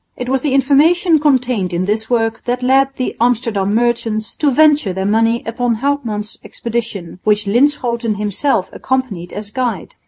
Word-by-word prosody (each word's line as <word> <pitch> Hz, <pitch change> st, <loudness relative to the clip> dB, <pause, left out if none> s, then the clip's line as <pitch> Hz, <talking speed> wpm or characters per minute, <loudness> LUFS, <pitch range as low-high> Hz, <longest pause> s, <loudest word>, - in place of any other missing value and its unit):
It 250 Hz, 0 st, -5 dB
was 265 Hz, -1 st, +1 dB
the 275 Hz, -2 st, 0 dB
information 310 Hz, +5 st, +3 dB
contained 250 Hz, -10 st, +1 dB
in 175 Hz, +2 st, -1 dB
this 215 Hz, +2 st, -1 dB
work 225 Hz, -2 st, 0 dB
that 245 Hz, 0 st, -2 dB
led 270 Hz, +1 st, +4 dB
the 255 Hz, -, -3 dB
Amsterdam 220 Hz, -4 st, +1 dB
merchants 225 Hz, -2 st, -1 dB
to 300 Hz, -, +2 dB
venture 295 Hz, -7 st, +3 dB
their 190 Hz, +1 st, -3 dB
money 225 Hz, +3 st, +1 dB
upon 235 Hz, +1 st, -1 dB
Houtman's 230 Hz, -5 st, -3 dB
expedition, 220 Hz, -7 st, -5 dB
which 210 Hz, 0 st, +2 dB
Linschoten 235 Hz, -1 st, +1 dB
himself 205 Hz, +1 st, 0 dB
accompanied 240 Hz, -10 st, -3 dB
as 205 Hz, 0 st, -6 dB
guide. 235 Hz, -7 st, -3 dB
235 Hz, 155 wpm, -16 LUFS, 210-260 Hz, -, led